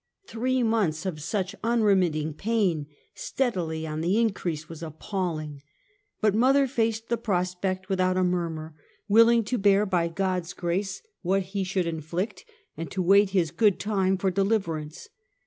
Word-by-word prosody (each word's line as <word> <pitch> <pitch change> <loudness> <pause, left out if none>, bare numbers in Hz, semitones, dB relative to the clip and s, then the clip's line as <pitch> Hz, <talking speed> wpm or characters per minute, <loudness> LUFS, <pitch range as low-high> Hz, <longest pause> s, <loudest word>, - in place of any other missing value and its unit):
Three 255 0 0
months 200 -8 +1
of 165 -5 -3
such 190 +4 -2
unremitting 190 -10 +2
pain, 185 -5 0 0.3
steadily 170 -11 -2
on 155 0 -4
the 180 +6 +1
in 225 -3 +2
crease, 160 -5 -4
was 165 -2 -10
appalling; 160 -3 -4 0.6
but 215 -2 +3
mother 265 +5 +4
faced 225 -2 -1
the 235 - +1
prospect 185 -2 -1
without 185 -1 +1
a 185 - +3
murmur, 165 -3 -2 0.3
willing 230 +2 +6
to 240 +4 -2
bear 200 +1 +4
by 180 -4 +1
God's 180 0 -2
grace 185 +3 -2 0.2
what 195 +2 +1
He 200 -1 0
should 185 -1 -1
inflict, 170 +5 -4 0.3
and 165 -2 -5
to 190 - -5
wait 200 +2 +5
His 180 -5 +1
good 200 +1 +3
time 190 -1 +1
for 190 0 0
de 195 +2 +1
liverance. 165 -8 -2
185 Hz, 155 wpm, -26 LUFS, 170-210 Hz, 0.6 s, willing